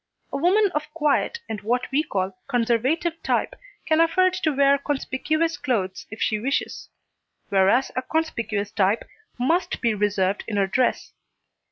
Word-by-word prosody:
A - - 0
woman 380 +6 +3
of 300 0 -3
quiet 325 +9 +1
and 215 -3 -5
what 245 +4 0
we 280 +3 +3
call 195 -10 -2
conservative 265 +7 0
type, - - 0 0.3
can 315 0 +3
afford 370 +3 +3
to 345 -4 0
wear 280 0 +4
conspicuous 305 +3 -1
clothes 210 -10 -2
if 220 - -9
she 215 - 0
wishes, 275 +6 -2 0.6
whereas 200 +7 +3
a 255 - 0
conspicuous 230 -9 -2
type 205 +1 +1 0.3
must 335 +9 0
be 230 -2 +1
reserved 200 -1 0
in 210 - -2
her 200 - +3
dress. 250 +6 0
260 Hz, 150 wpm, -24 LUFS, 215-315 Hz, 0.6 s, wear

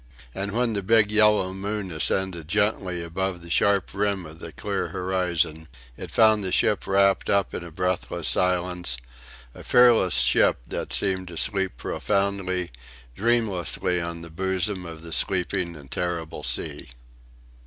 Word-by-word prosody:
And 100 +1 -4
when 120 0 +1
the 100 - -1
big 105 +1 +3
yellow 105 -3 +3
moon 100 0 -4
ascended 85 0 0
gently 95 -3 0
above 90 +1 -3
the 85 - -9
sharp 100 +2 +2
rim 100 -2 -1
of 80 +1 -12
the 85 - -8
clear 70 - -3
horizon 85 -4 -1 0.3
it - - -8
found 110 -2 +4
the 95 - -2
ship 105 - +2
wrapped 100 0 +3
up 100 -2 +1
in - - -4
a 85 - -8
breathless 90 +2 -2
silence; 90 -6 0 0.6
a - - -12
fearless 120 -7 +5
ship 65 +1 +4
that - - -4
seemed 95 -2 0
to 85 -1 -8
sleep 95 -1 0
profoundly, 95 -3 -1 0.4
dreamlessly 95 - +1
on 85 0 -5
the 85 -1 -10
bosom 95 +1 -1
of 80 -1 -9
the 85 -1 -6
sleeping 90 -1 -1
and 70 -3 -13
terrible 85 -2 -3
sea. - - -2
95 Hz, 150 wpm, -25 LUFS, 85-100 Hz, 0.6 s, fearless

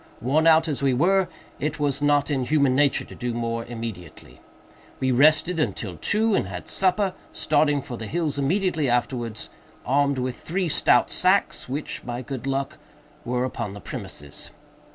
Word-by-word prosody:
Worn 150 +7 +2
out 160 0 +5
as 145 -3 -2
we 135 -2 +2
were, 185 +6 +3 0.3
it 150 +2 -2
was 145 -1 0
not 145 0 +2
in 135 -3 0
human 140 -1 +2
nature 140 0 +2
to - - -12
do 120 -2 -4
more 115 0 -2
immediately. 115 -8 -8 0.6
We 130 0 +1
rested 155 +6 +4
until 100 - -2
two, 215 - +2
and 100 - +1
had 90 -2 -7
supper; 190 0 +1 0.2
starting 145 -2 +1
for 125 -4 -7
the 110 - -6
hills 155 -2 -1
immediately 160 -1 +1
afterwards, 120 -2 -2 0.3
armed 140 +1 +2
with 125 0 -2
three 180 +1 -2
stout - - +3
sacks, - - +1
which, 150 +3 -4
by 120 +1 -5
good 135 0 -6
luck, 135 0 -2 0.4
were 125 +1 -1
upon 115 -5 -4
the - - -8
premises. 70 -5 -8
140 Hz, 165 wpm, -24 LUFS, 120-155 Hz, 0.6 s, out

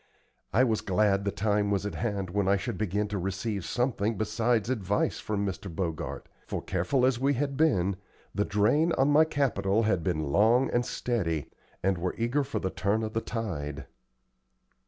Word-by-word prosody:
I 120 +6 +4
was 115 -4 +1
glad 100 0 +2
the 100 - +1
time 105 0 +1
was 100 -1 0
at 105 - -3
hand 100 -1 -2
when 100 0 0
I 100 +1 +4
should 120 +2 -4
begin 105 +2 -1
to 105 -1 -2
receive 95 +2 -3
something 115 -3 -1
besides 110 +1 +1
advice 105 -5 0
from 100 -1 -2
Mr. 100 +1 -4
Bogart; 80 -1 -4 0.2
for, - - -2
careful 95 +9 0
as 130 -2 +2
we 140 +2 +2
had 140 +2 -1
been, 100 - +2 0.4
the 100 - +1
drain 110 - +2
on 135 -1 +3
my 155 +2 +6
capital 120 -8 +1
had 105 -6 +1
been 80 -5 -1
long 115 - +4
and 120 - +2
steady, 85 - -2 0.3
and 95 -2 +1
were 90 +1 -2
eager 120 +5 +1
for 140 +1 -4
the 95 - -2
turn 100 +5 0
of 110 0 -4
the 115 - 0
tide. 80 - -4
105 Hz, 180 wpm, -28 LUFS, 95-120 Hz, 0.4 s, my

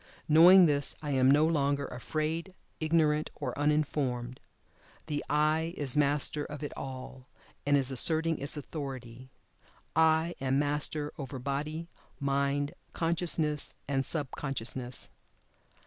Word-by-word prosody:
Knowing 175 +4 +8
this 145 -3 +1
I 145 - -2
am 130 -1 +4
no 150 +3 +5
longer 140 -3 +1
afraid, 155 +8 -3 0.2
ignorant 155 -1 +2
or 130 -4 -4
uninformed. 140 -4 0 0.7
The 145 -2 -3
"I" 155 +3 +1
is 140 -4 -2
master 145 0 +1
of 150 +1 -7
it 145 - -4
all, 130 -1 -8 0.4
and 145 0 +5
is 135 -1 0
asserting 160 +4 +3
its 140 +2 0
authority. 130 -4 -7 0.7
"I" 160 +1 +3
am 135 0 +1
master 145 +1 -1
over 135 -1 -5
Body, 150 +5 -3 0.3
Mind, 140 0 0 0.2
Consciousness, 165 -3 0
and 135 -1 0
Sub 145 -2 -3
consciousness. 130 -2 -3
145 Hz, 120 wpm, -30 LUFS, 135-155 Hz, 0.7 s, Knowing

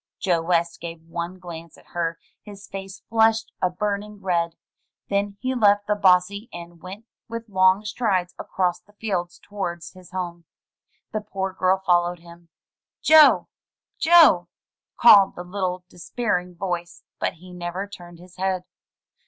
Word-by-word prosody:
Joe 175 -3 +1
West 170 0 0
gave 165 -1 -7
one 170 +2 -5
glance 170 -3 -10
at - - -21
her; 165 -1 -2 0.2
his 200 -1 -12
face 195 0 -8
flushed 225 0 +2
a 185 - +2
burning 205 +2 -3
red; 170 -3 -1 0.5
then 200 0 -1
he 260 0 -1
left 205 -4 +3
the 210 - +1
bossy 200 +2 +2
and 170 -1 -10
went 195 +5 -9 0.2
with 230 0 -6
long 190 +1 +3
strides 200 -5 -1
across 180 -2 -1
the 205 - -26
fields 190 -5 -3
towards 175 -5 -6
his 185 -2 -16
home. 175 -2 -5 0.7
The 215 - -2
poor 195 -2 -4
girl 190 0 +1
followed 175 -1 +2
him. 170 0 -16 0.5
"Joe! 310 -1 +7 0.5
Joe!'' 315 - +6 0.5
called 205 -5 +7
the 175 - -6
little 180 -1 -3
despairing 180 -1 -3
voice, 175 -1 -4 0.2
but - - -1
he 180 +2 -14
never 180 +2 -4
turned 175 -4 -12
his 180 +1 -16
head. 185 -1 -1
185 Hz, 145 wpm, -23 LUFS, 175-205 Hz, 0.7 s, Joe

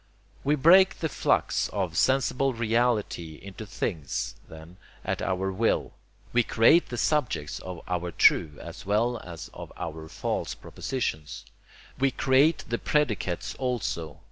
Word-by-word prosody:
We 145 +2 +3
break 185 +7 +6
the 160 - -2
flux - - +1
of 95 -5 -2
sensible 135 +3 +2
reality 115 -8 0
into 100 +2 -9
things, 70 - -3 0.2
then, 80 +3 -12 0.3
at - - -2
our 95 0 -1
will. 110 +4 0 0.4
We 120 - +5
create 115 +9 +4
the 120 - -4
subjects 115 - 0
of 90 -2 -7
our 90 -1 -2
true 75 -2 +4
as 85 +2 -9
well 110 +4 +1
as 85 -5 -9
of - - -9
our 80 -1 -6
false - - -3
propositions. 115 - -4 0.5
We 135 +1 +4
create 135 +5 +3
the 115 0 -2
predicates 105 - 0
also. 100 - -3
110 Hz, 135 wpm, -27 LUFS, 85-130 Hz, 0.5 s, break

